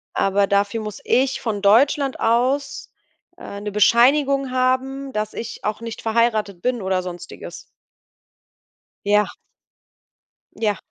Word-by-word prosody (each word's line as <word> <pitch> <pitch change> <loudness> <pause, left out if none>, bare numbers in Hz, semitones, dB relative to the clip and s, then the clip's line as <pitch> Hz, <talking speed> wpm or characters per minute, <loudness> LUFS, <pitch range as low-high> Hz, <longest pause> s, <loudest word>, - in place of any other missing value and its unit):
aber 195 +1 +2
dafür 200 +3 +1
muss 210 -1 -7
ich 265 +1 +1
von 215 -4 -3
Deutschland 270 +6 +3
aus, 255 +5 0 0.5
äh, 200 - -8
'ne 210 0 -4
Bescheinigung 270 +5 +3
haben, 260 +2 0
dass 215 0 -3
ich 230 0 -7
auch 210 +2 -2
nicht 230 -1 -7
verheiratet 220 -5 0
bin 245 -1 -1
oder 190 -1 0
sonstiges. 175 -1 -9 1.4
Ja. 210 +1 +3 1.3
Ja. 210 -3 0
225 Hz, 115 wpm, -21 LUFS, 205-260 Hz, 1.4 s, Deutschland